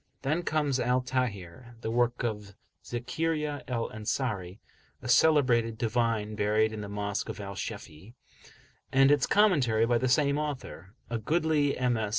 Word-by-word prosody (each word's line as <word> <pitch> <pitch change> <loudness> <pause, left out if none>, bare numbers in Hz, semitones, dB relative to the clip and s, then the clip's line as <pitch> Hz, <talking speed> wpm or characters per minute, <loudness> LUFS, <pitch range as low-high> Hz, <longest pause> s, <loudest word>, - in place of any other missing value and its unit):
Then 155 +5 0
comes 150 -5 0
Al 125 +1 +1
Tahrir, 120 -3 -4
the 110 - -3
work 120 +1 +1
of 105 -4 -4 0.3
Zakariya 145 +4 -2
al 115 -2 -2
Ansari, 105 -4 -3 0.4
a 125 - -8
celebrated 120 -5 +4
divine 115 -2 0
buried 105 +1 +1
in 110 - -5
the 105 - -6
Mosque 100 0 -3
of - - -6
Al 100 -1 -6
Shafe'i, 100 +1 -8 0.8
and 135 +1 +5
its 145 -3 +3
commentary 140 - +3
by 120 0 +2
the 130 +1 0
same 140 +2 +2
author, 130 - -6 0.2
a 115 - -1
goodly 155 +2 +1
MS. 120 -4 0
120 Hz, 150 wpm, -29 LUFS, 105-140 Hz, 0.8 s, and